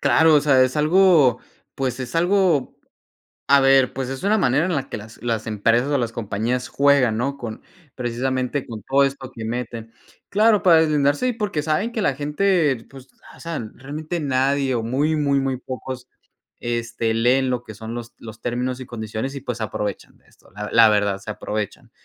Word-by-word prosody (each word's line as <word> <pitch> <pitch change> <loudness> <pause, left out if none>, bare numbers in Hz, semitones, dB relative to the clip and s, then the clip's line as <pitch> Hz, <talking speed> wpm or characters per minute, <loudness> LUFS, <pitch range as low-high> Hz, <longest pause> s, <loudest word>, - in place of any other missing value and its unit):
Claro, 160 -1 +5
o 145 - +6
sea, 135 -3 +4
es 130 +3 0
algo, 155 -5 +4 0.4
pues, 130 -2 -2
es 130 +5 -6
algo, 175 -4 +2 0.7
a 140 0 +6
ver, 135 -2 +4
pues, 130 -1 -4
es 135 +4 -6
una 215 +2 +3
manera 145 0 +2
en 180 - -1
la 135 -2 -2
que - - -4
las 110 +2 -12
las 115 -2 -2
empresas 115 +5 +1
o 145 - +2
las 120 -3 -1
compañías 115 +3 -2
juegan, 140 -5 +3
¿no?, 140 +4 -2
con 115 -4 -7 0.3
precisamente 130 +2 -2
con 110 -3 -8
todo 140 +1 +3
esto 135 -1 -3
que 115 - -6
meten. 115 -1 -5 0.4
Claro, 210 -1 +3
para 170 -3 +6
deslindarse, 150 - +2
y, 250 - 0
porque 205 -9 -2
saben 155 +9 -1
que 230 - -3
la 140 -9 +1
gente, 150 -3 +1
pues 135 -1 -14 0.2
hacen 155 -10 -7
realmente 155 +6 -5
nadie 135 0 +1
o 115 - -1
muy, 145 +7 0
muy, 140 -2 +2
muy 135 -1 -1
pocos, 130 0 -7 0.5
este, 115 -1 -2
leen 125 +3 +2
lo 125 -1 -2
que 110 - -10
son 110 +2 -7
los 120 -1 -7
los 110 -1 -11
términos 125 +1 -2
y 130 - -7
condiciones, 110 +3 -5
y 140 - -6
pues 125 -3 -4
se 115 - -4
aprovechan 105 -1 -5
esto. - - -24
La 105 +2 -6
la 115 -1 +7
verdad 105 -2 +1
se 105 +2 -6
aprovechan. 105 0 -5
130 Hz, 190 wpm, -22 LUFS, 115-145 Hz, 0.7 s, la